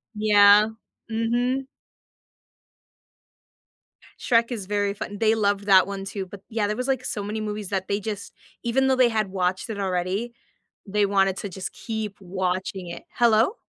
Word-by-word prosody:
Yeah. 210 Hz, 0 st, +6 dB, 0.4 s
Mhm. 240 Hz, +4 st, 0 dB, 2.5 s
Shrek 230 Hz, 0 st, +2 dB
is 215 Hz, -6 st, -4 dB
very 205 Hz, 0 st, 0 dB
fun 205 Hz, 0 st, -6 dB
they 220 Hz, 0 st, +3 dB
loved 205 Hz, -2 st, +1 dB
that 190 Hz, -2 st, +6 dB
one 195 Hz, -1 st, -5 dB
too, 195 Hz, 0 st, -5 dB
but, 190 Hz, +1 st, -11 dB
yeah, 220 Hz, -2 st, 0 dB
there 210 Hz, -, -1 dB
was, 250 Hz, +3 st, -3 dB
like, 260 Hz, -2 st, 0 dB
so 205 Hz, -, -3 dB
many 215 Hz, +2 st, -3 dB
movies 210 Hz, -2 st, -4 dB
that 190 Hz, -1 st, -2 dB
they 200 Hz, +1 st, 0 dB
just 205 Hz, -1 st, -6 dB, 0.3 s
even 265 Hz, +3 st, +2 dB
though 265 Hz, -, +3 dB
they 255 Hz, -2 st, +5 dB
had 215 Hz, -3 st, 0 dB
watched 185 Hz, +2 st, -1 dB
it 215 Hz, -2 st, -4 dB
already, 190 Hz, +5 st, -1 dB, 0.5 s
they 205 Hz, 0 st, +1 dB
wanted 195 Hz, -1 st, +2 dB
to 205 Hz, -, -5 dB
just 185 Hz, +1 st, -6 dB
keep 220 Hz, -3 st, -5 dB
watching 185 Hz, 0 st, -3 dB
it 170 Hz, -, -8 dB
Hello? 235 Hz, -, +4 dB
205 Hz, 160 wpm, -24 LUFS, 195-225 Hz, 2.5 s, Yeah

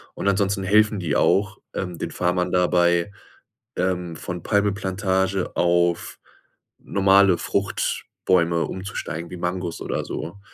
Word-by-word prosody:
Und -, -, -3 dB
ansonsten 100 Hz, 0 st, +1 dB
helfen 105 Hz, +2 st, +3 dB
die 85 Hz, -5 st, -1 dB
auch, 95 Hz, 0 st, +2 dB
ähm, 90 Hz, -2 st, -4 dB
den -, -, -4 dB
Farmern 90 Hz, 0 st, 0 dB
dabei, 85 Hz, 0 st, +3 dB, 0.7 s
ähm, 90 Hz, -2 st, -1 dB
von 90 Hz, +1 st, -6 dB
Palmöl-Plantage 95 Hz, -2 st, 0 dB
auf 85 Hz, -1 st, +1 dB, 0.6 s
normale 100 Hz, -1 st, +4 dB
Fruchtbäume 85 Hz, -3 st, 0 dB
umzusteigen, 85 Hz, -3 st, -5 dB
wie 90 Hz, -, -7 dB
Mangos 90 Hz, -1 st, -3 dB
oder -, -, -2 dB
so. 85 Hz, +5 st, -6 dB
95 Hz, 115 wpm, -23 LUFS, 85-100 Hz, 0.7 s, normale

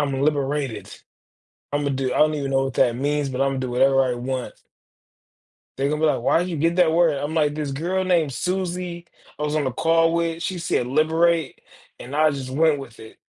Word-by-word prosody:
I'm 135 Hz, -, -2 dB
liberated. 140 Hz, -7 st, -1 dB, 0.8 s
Imma 145 Hz, -1 st, 0 dB
do, 130 Hz, -1 st, -1 dB
I -, -, 0 dB
don't 155 Hz, 0 st, +4 dB
even 140 Hz, -2 st, -3 dB
know 135 Hz, 0 st, +2 dB
what 135 Hz, -1 st, -4 dB
that 120 Hz, -1 st, +2 dB
means, 145 Hz, +2 st, -1 dB
but 130 Hz, 0 st, -1 dB
Imma 135 Hz, -1 st, -1 dB
do 130 Hz, -1 st, -3 dB
whatever 135 Hz, +2 st, +3 dB
I 130 Hz, -2 st, 0 dB
want. 125 Hz, +1 st, -4 dB, 1.2 s
They 135 Hz, +1 st, 0 dB
gone 150 Hz, -, -1 dB
be 160 Hz, -, +2 dB
like, 150 Hz, -, +1 dB
"Why 130 Hz, -, +3 dB
did 180 Hz, +1 st, -2 dB
you 170 Hz, -, -3 dB
get 165 Hz, +3 st, +1 dB
that 180 Hz, -3 st, +4 dB
word?" 165 Hz, -3 st, +3 dB
I'm 145 Hz, +3 st, -4 dB
like, 150 Hz, -2 st, +1 dB
"This 150 Hz, -2 st, -3 dB
girl 175 Hz, +7 st, -1 dB
named 170 Hz, -5 st, +2 dB
Suzie, 180 Hz, +2 st, -3 dB, 0.3 s
I -, -, -2 dB
was 150 Hz, 0 st, -1 dB
on 155 Hz, -, +1 dB
the 130 Hz, -, -1 dB
call 165 Hz, +4 st, +2 dB
with, 170 Hz, 0 st, -1 dB
she 185 Hz, -2 st, -3 dB
said 125 Hz, -, 0 dB
liberate, 160 Hz, +2 st, +1 dB, 0.4 s
and 130 Hz, +4 st, -7 dB
I 155 Hz, +1 st, +4 dB
just 135 Hz, -2 st, -5 dB
went 150 Hz, +1 st, +2 dB
with 125 Hz, -4 st, -11 dB
it. 110 Hz, 0 st, -13 dB
150 Hz, 215 wpm, -23 LUFS, 135-165 Hz, 1.2 s, don't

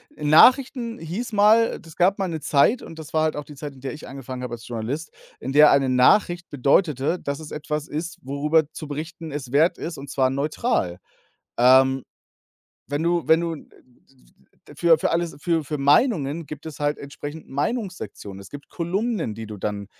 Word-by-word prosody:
Nachrichten 235 Hz, -, +4 dB
hieß 190 Hz, +9 st, -5 dB
mal 215 Hz, +3 st, +4 dB
es 160 Hz, -, -13 dB
gab 185 Hz, +2 st, +3 dB
mal 195 Hz, -, -1 dB
'ne 160 Hz, -2 st, -4 dB
Zeit 150 Hz, -, +3 dB
und 165 Hz, -, -11 dB
das 155 Hz, -2 st, -10 dB
war 155 Hz, 0 st, +2 dB
halt 155 Hz, -, 0 dB
auch 150 Hz, -, -4 dB
die 150 Hz, -, -13 dB
Zeit, 145 Hz, +1 st, -7 dB
in 130 Hz, -, -17 dB
der 135 Hz, -, -5 dB
ich 150 Hz, -, -10 dB
angefangen 130 Hz, -2 st, -7 dB
habe 125 Hz, -, -5 dB
als 120 Hz, 0 st, -8 dB
Journalist, 120 Hz, +7 st, -4 dB, 0.3 s
in -, -, -5 dB
der 150 Hz, +2 st, +7 dB
eine 140 Hz, -1 st, +3 dB
Nachricht 175 Hz, +7 st, +3 dB
bedeutete, 145 Hz, +3 st, +1 dB
dass 140 Hz, +1 st, -4 dB
es 155 Hz, -1 st, -10 dB
etwas 150 Hz, 0 st, -4 dB
ist, 160 Hz, +3 st, -5 dB
worüber 150 Hz, +3 st, +1 dB
zu 155 Hz, -, -8 dB
berichten 160 Hz, +2 st, -6 dB
es 140 Hz, -4 st, -6 dB
wert 160 Hz, +5 st, +3 dB
ist, 165 Hz, -1 st, -6 dB
und 140 Hz, 0 st, -9 dB
zwar 130 Hz, -1 st, +1 dB
neutral. 140 Hz, -, -1 dB, 0.6 s
Ähm, 130 Hz, +2 st, +5 dB, 0.8 s
wenn 145 Hz, +3 st, -2 dB
du 170 Hz, -1 st, 0 dB
wenn 160 Hz, +1 st, +5 dB
du, 170 Hz, -1 st, -2 dB
äh, 155 Hz, -, -12 dB, 1.1 s
für 170 Hz, -2 st, +4 dB
für -, -, 0 dB
alles 170 Hz, 0 st, -1 dB
für 165 Hz, -2 st, 0 dB
für 150 Hz, +2 st, -4 dB
Meinungen 150 Hz, -, +2 dB
gibt 150 Hz, +1 st, -9 dB
es 155 Hz, -2 st, -9 dB
halt 145 Hz, 0 st, 0 dB
entsprechend 145 Hz, +2 st, -8 dB
Meinungssektionen. 140 Hz, -, -4 dB
Es 100 Hz, -, -13 dB
gibt 145 Hz, 0 st, -10 dB
Kolumnen, 185 Hz, -, -2 dB
die 115 Hz, 0 st, -7 dB
du 105 Hz, 0 st, -8 dB
dann, 100 Hz, 0 st, -4 dB
150 Hz, 190 wpm, -23 LUFS, 135-170 Hz, 1.1 s, der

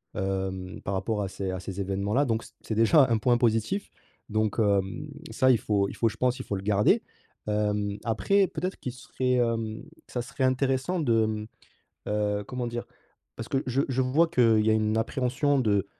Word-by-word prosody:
hem, 95 Hz, -1 st, -3 dB
par 100 Hz, -, -3 dB
rapport 105 Hz, +2 st, -1 dB
à 100 Hz, -, -1 dB
ces 95 Hz, 0 st, -4 dB
à 95 Hz, -, -4 dB
ces 95 Hz, +1 st, -5 dB
évènements 100 Hz, +2 st, -2 dB
là 140 Hz, +4 st, +4 dB
donc 115 Hz, -3 st, -1 dB
c -, -, -14 dB
c'est 110 Hz, -, -4 dB
déjà 115 Hz, +6 st, +6 dB
un 115 Hz, -, +3 dB
point 120 Hz, +2 st, +3 dB
positif, 120 Hz, -, 0 dB, 0.4 s
donc, 110 Hz, -1 st, 0 dB
hem, 100 Hz, +5 st, +1 dB, 0.2 s
ça 130 Hz, -1 st, +4 dB
il 125 Hz, -, +5 dB
faut 100 Hz, -2 st, +1 dB
il -, -, -8 dB
faut 115 Hz, -, +2 dB
je 110 Hz, -, -10 dB
pense, 125 Hz, +2 st, +1 dB
il 130 Hz, -, -6 dB
faut 100 Hz, -, -2 dB
le 95 Hz, -, -5 dB
garder. 105 Hz, 0 st, +3 dB, 0.4 s
Hem, 105 Hz, -1 st, 0 dB
après, 190 Hz, -, +2 dB
peut-être 180 Hz, +4 st, -4 dB
qu'il 125 Hz, -, -4 dB
serait, 125 Hz, 0 st, -2 dB
hem, 115 Hz, -2 st, -1 dB, 0.2 s
ça 120 Hz, -, -3 dB
serait 135 Hz, +1 st, -4 dB
intéressant 135 Hz, +6 st, +1 dB
de 115 Hz, -6 st, +3 dB
mmh, 110 Hz, -1 st, -3 dB, 0.6 s
heu, 105 Hz, -1 st, 0 dB
comment 125 Hz, -1 st, -3 dB
dire? 120 Hz, 0 st, -4 dB, 0.5 s
Parce 115 Hz, -, -6 dB
que 135 Hz, -, +1 dB
je 130 Hz, +2 st, +1 dB
je 130 Hz, 0 st, +1 dB
vois 140 Hz, +7 st, +3 dB
qu'il 115 Hz, -9 st, +4 dB
y 110 Hz, -, +4 dB
a -, -, +4 dB
une 110 Hz, 0 st, +1 dB
appréhension 135 Hz, +4 st, +1 dB
de 100 Hz, -4 st, +1 dB
110 Hz, 205 wpm, -27 LUFS, 105-130 Hz, 0.6 s, déjà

